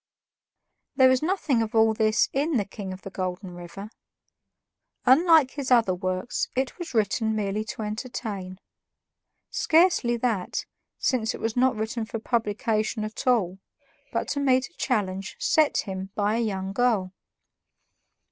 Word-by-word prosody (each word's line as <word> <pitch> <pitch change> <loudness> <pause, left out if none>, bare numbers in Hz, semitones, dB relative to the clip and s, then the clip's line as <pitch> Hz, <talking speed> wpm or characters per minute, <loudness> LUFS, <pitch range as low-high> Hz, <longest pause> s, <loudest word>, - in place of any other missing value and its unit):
There 260 -1 +6
is 260 - +2
nothing 315 -8 +1
of 225 0 -3
all 220 0 +5
this 215 0 +2
in 290 +1 +1
"The 205 - 0
King 195 -1 -7
of 185 0 -9
the 195 - -7
Golden 185 0 -4
River." 175 +4 -9 1.1
Unlike 305 +1 +6
his 280 -3 -4
other 230 -7 +4
works, 185 +4 -2
it 260 +6 -2
was 340 -7 -6
written 220 +1 +1
merely 210 0 -1
to 220 +1 -5
entertain. 210 -4 -5 0.9
Scarcely 320 -8 +3
that, 225 -6 -1 0.3
since 235 -5 0
it - - -9
was 225 -1 -2
not 255 +1 +3
written 220 +1 -3
for 225 - -5
publication 215 -1 -1
at 215 +4 -6
all, 195 -7 +2 0.5
but - - -1
to 285 - -1
meet 260 -2 +2
a - - -31
challenge 195 -4 -2
set 310 -2 +2
him 190 0 -6
by 210 +1 +1
a - - 0
young 195 -4 -2
girl. 210 -5 +1
220 Hz, 145 wpm, -26 LUFS, 195-255 Hz, 1.1 s, There